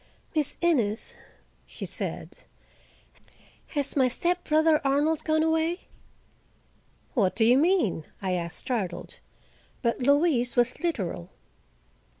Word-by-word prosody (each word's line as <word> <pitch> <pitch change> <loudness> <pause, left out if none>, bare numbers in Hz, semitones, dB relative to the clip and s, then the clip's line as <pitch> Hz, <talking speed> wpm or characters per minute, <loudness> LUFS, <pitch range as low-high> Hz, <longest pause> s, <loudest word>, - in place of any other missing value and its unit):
"Miss 300 -3 0
Innes," 245 -11 +1 0.5
she - - -6
said, - - -5 1.2
"has 285 -2 -1
my 265 -3 +4
stepbrother 315 +1 +2
Arnold 290 +3 +1
gone 315 0 +2
away?" 320 +2 +1 1.3
"What 200 -9 +1
do 225 - +3
you 245 +3 +5
mean?" 315 - +2
I 190 -2 -2
asked, 170 -2 -3
startled. 230 -9 -4 0.6
But 235 -1 +1
Louise 280 -2 +2
was 245 0 +2
literal. 190 - -3
280 Hz, 105 wpm, -27 LUFS, 230-320 Hz, 1.3 s, you